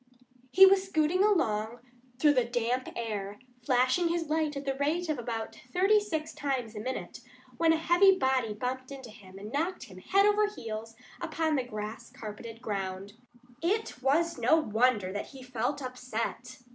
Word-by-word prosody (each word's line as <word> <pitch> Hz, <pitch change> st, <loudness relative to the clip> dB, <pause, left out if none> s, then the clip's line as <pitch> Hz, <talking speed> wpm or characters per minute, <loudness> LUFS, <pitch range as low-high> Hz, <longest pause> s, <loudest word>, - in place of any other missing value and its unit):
He 380 Hz, +9 st, +8 dB
was 385 Hz, 0 st, +5 dB
scooting 355 Hz, +1 st, +2 dB
along 225 Hz, -, +1 dB, 0.4 s
through 295 Hz, +2 st, +5 dB
the 255 Hz, -3 st, +3 dB
damp 240 Hz, +2 st, -1 dB
air, 210 Hz, -3 st, -4 dB, 0.3 s
flashing 255 Hz, +7 st, +2 dB
his 335 Hz, -2 st, -1 dB
light 305 Hz, -2 st, 0 dB
at 280 Hz, -, -6 dB
the 270 Hz, -, 0 dB
rate 310 Hz, +5 st, -1 dB
of 300 Hz, -4 st, -1 dB
about 230 Hz, -2 st, -4 dB, 0.2 s
thirty 390 Hz, +7 st, +4 dB
six 320 Hz, -7 st, -4 dB
times 265 Hz, -6 st, -3 dB
a -, -, -5 dB
minute, 255 Hz, +4 st, -5 dB, 0.4 s
when 330 Hz, -1 st, +4 dB
a -, -, +4 dB
heavy 350 Hz, +4 st, +5 dB
body 265 Hz, -7 st, +1 dB
bumped 255 Hz, +4 st, -4 dB
into 265 Hz, -4 st, -9 dB
him 195 Hz, -3 st, -14 dB
and 205 Hz, +2 st, -8 dB
knocked 335 Hz, +7 st, -2 dB
him 185 Hz, -5 st, -12 dB
head 395 Hz, -, +3 dB
over 415 Hz, 0 st, +4 dB
heels 225 Hz, -, -7 dB, 0.3 s
upon 320 Hz, -1 st, 0 dB
the 265 Hz, -, +1 dB
grass 215 Hz, -2 st, -7 dB
carpeted 225 Hz, +2 st, -9 dB
ground. 195 Hz, -2 st, -4 dB, 0.5 s
It 395 Hz, -, -1 dB
was 330 Hz, +6 st, +1 dB
no -, -, +4 dB
wonder 225 Hz, -8 st, +1 dB
that 205 Hz, -, -4 dB
he 265 Hz, -2 st, -12 dB
felt 255 Hz, +3 st, -2 dB
upset. 250 Hz, 0 st, -5 dB
260 Hz, 170 wpm, -29 LUFS, 225-325 Hz, 0.5 s, He